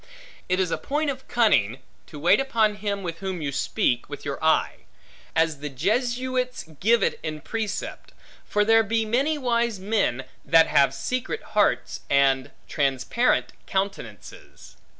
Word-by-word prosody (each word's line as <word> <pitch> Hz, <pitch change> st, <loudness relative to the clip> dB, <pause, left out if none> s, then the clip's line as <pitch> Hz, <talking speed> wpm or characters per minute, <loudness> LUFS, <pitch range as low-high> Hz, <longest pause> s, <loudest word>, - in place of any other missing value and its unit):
It 185 Hz, +1 st, +1 dB
is 185 Hz, -3 st, 0 dB
a -, -, -1 dB
point 295 Hz, +1 st, -1 dB
of 265 Hz, -1 st, -10 dB
cunning, 135 Hz, -, +2 dB, 0.3 s
to 150 Hz, -, -10 dB
wait 165 Hz, -, +4 dB
upon 225 Hz, -6 st, +1 dB
him 200 Hz, -1 st, -3 dB
with 165 Hz, -2 st, -5 dB
whom 190 Hz, -2 st, -4 dB
you 145 Hz, -3 st, -3 dB
speak, 120 Hz, -2 st, 0 dB
with -, -, -8 dB
your -, -, -4 dB
eye; -, -, +2 dB, 0.6 s
as 160 Hz, -2 st, +1 dB
the 150 Hz, +1 st, -5 dB
Jesuits 250 Hz, -, -1 dB, 0.2 s
give 225 Hz, +1 st, +3 dB
it -, -, 0 dB
in 155 Hz, -1 st, -4 dB
precept: 220 Hz, -2 st, -4 dB, 0.3 s
for 210 Hz, 0 st, +1 dB
there 225 Hz, +1 st, +6 dB
be 225 Hz, +1 st, 0 dB
many 270 Hz, +8 st, +1 dB
wise 235 Hz, -5 st, 0 dB
men, 195 Hz, -, 0 dB, 0.2 s
that 165 Hz, -1 st, +5 dB
have 135 Hz, -1 st, +3 dB
secret 255 Hz, -, -3 dB
hearts, -, -, +1 dB
and 135 Hz, -1 st, +3 dB, 0.2 s
transparent 140 Hz, -, +1 dB
countenances. 195 Hz, +1 st, -5 dB
205 Hz, 150 wpm, -25 LUFS, 155-240 Hz, 0.6 s, there